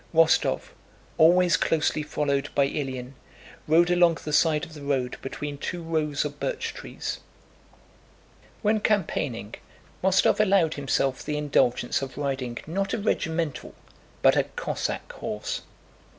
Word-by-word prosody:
Rostóv, 165 0 +3 0.5
always 175 +1 +6
closely 155 -1 +1
followed 145 -1 -1
by 140 -1 +4
Ilyín, 130 -3 -4 0.6
rode 170 +3 +4
along 175 -2 +4
the 150 - -4
side 155 -1 +3
of 160 - -14
the 150 - -10
road 135 -3 -1
between 145 +1 -5
two 175 +3 -4
rows 155 -3 -1
of 145 -1 -6
birch - - -2
trees. - - -6 1.4
When 215 +1 +3
campaigning, 150 - -1 0.5
Rostóv 190 +2 +4
allowed 190 -6 +4
himself 135 -2 0
the 150 - -2
indulgence 140 -5 +1
of 135 -1 -6
riding 135 -4 -2
not 195 +5 -1
a - - -2
regimental 165 -7 -2 0.5
but - - +6
a - - +2
Cossack - - -4
horse. - - -4
150 Hz, 130 wpm, -26 LUFS, 140-170 Hz, 1.4 s, always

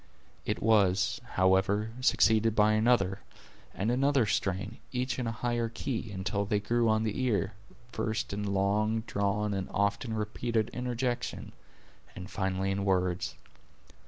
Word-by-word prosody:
It - - -1
was, 100 0 +3
however, 95 +3 +2
succeeded 110 -3 +3
by 105 0 +5
another 110 -4 +2 0.5
and 105 +4 -1
another 135 0 +3
strain, 100 +1 -2
each 130 +1 -2
in 125 - -2
a - - -1
higher 120 0 -1
key, 115 0 -4
until 100 +1 -2
they 105 +1 0
grew 115 +2 +1
on 110 0 +2
the 110 +3 -2
ear, 105 -5 0 0.4
first 110 -3 -2
in 100 0 -2
long 105 +3 +1
drawn 105 -1 -1
and 95 -1 -3
often 100 +3 0
repeated 110 +1 -1
interjections, 125 0 -3 0.6
and 95 +2 -8
finally 95 -1 -1
in 100 0 -1
words. 90 -2 0
105 Hz, 135 wpm, -30 LUFS, 100-115 Hz, 0.6 s, by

